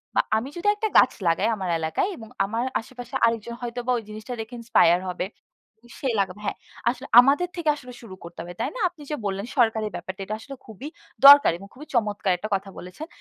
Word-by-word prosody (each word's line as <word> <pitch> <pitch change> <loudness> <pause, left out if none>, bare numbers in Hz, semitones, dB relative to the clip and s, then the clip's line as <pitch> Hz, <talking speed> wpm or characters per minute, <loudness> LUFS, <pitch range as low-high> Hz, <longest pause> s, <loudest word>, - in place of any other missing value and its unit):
বা - - +5 0.2
আমি 250 +5 -3
যদি 360 - -3
একটা 435 +1 -1
গাছ 255 - +6 0.2
লাগাই 170 +6 +2
আমার 190 -3 -4
এলাকায়, 160 - -1
এবং 225 - -10 0.2
আমার 225 +4 -2 0.2
আশেপাশে 245 +1 -10
আরেকজন 230 0 -1
হয়তোবা 245 +1 -3
ওই 230 - -5
জিনিসটা 215 +3 -7
দেখে 225 +2 -7
ইন্সপায়ার 185 -6 +4
হবে। 180 - -3 0.7
সে 270 - -2
লাগাবে 200 +1 -2
হ্যাঁ। - - -2 0.3
আসলে 255 +2 -5
আমাদের 280 +7 +4
থেকে 330 -3 -1
আসলে 250 -4 -11
শুরু 200 -5 -10
করতে 170 0 -11
হবে। 175 +1 -8
তাই - - -1
না? - - -5
আপনি 335 -4 -18
যে - - 0
বললেন 195 +1 -2
সরকারের 220 -3 +2
ব্যাপারটা 185 +3 -7
এটা 215 +2 -3
আসলে 275 +5 -9
খুবই 225 +6 -9 0.4
দরকার 285 -5 +10
এবং 195 +3 -12
খুবই 295 +4 -12
চমৎকার 210 -4 +1
একটা 215 +5 -6
কথা 195 0 -5
বলেছেন। 180 - -9
225 Hz, 205 wpm, -24 LUFS, 195-255 Hz, 0.7 s, দরকার